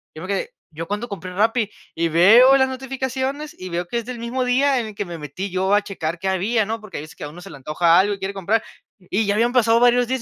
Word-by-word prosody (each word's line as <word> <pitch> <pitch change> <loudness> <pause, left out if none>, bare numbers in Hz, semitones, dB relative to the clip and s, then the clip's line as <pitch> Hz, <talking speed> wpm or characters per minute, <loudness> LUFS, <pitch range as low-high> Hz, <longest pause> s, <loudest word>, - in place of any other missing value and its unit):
Yo 155 - -8
me 185 - -7
quedé: 200 - -3 0.2
"¿Yo 165 +1 -7
cuándo 210 +5 -3
compré 185 -2 -7
Rappi?", 220 +2 +1 0.3
y 165 0 +1
veo 220 +11 +7
las 265 -1 +2
notificaciones 265 +2 -4
y 185 - -7
veo 175 0 -3
que 235 - -3
es 235 - -3
del 250 -1 -6
mismo 240 +3 -2
día 265 +2 +2
en 230 - -3
el 215 - -10
que 205 - -3
me 170 -2 -7
metí 155 +6 -6
yo 190 +2 0
a 205 - +5
checar 175 -5 -5
qué 195 - -3
había, 205 +4 +1
¿no? 225 +2 -4
Porque 215 -3 -8
hay 145 - -5
veces 160 +3 -13
que - - -10
a 145 - -5
uno 170 +4 -12
se 195 - -11
le 155 - -10
antoja 165 +5 +2
algo 205 +2 +2
y 200 - -7
quiere 195 +1 -4
comprar. 200 +3 0 0.4
Y 195 +4 -1
ya 205 - +1
habían 235 +3 +2
pasado 230 -2 +4
varios 245 0 +4
días 260 0 -2
205 Hz, 280 wpm, -21 LUFS, 180-245 Hz, 0.4 s, veo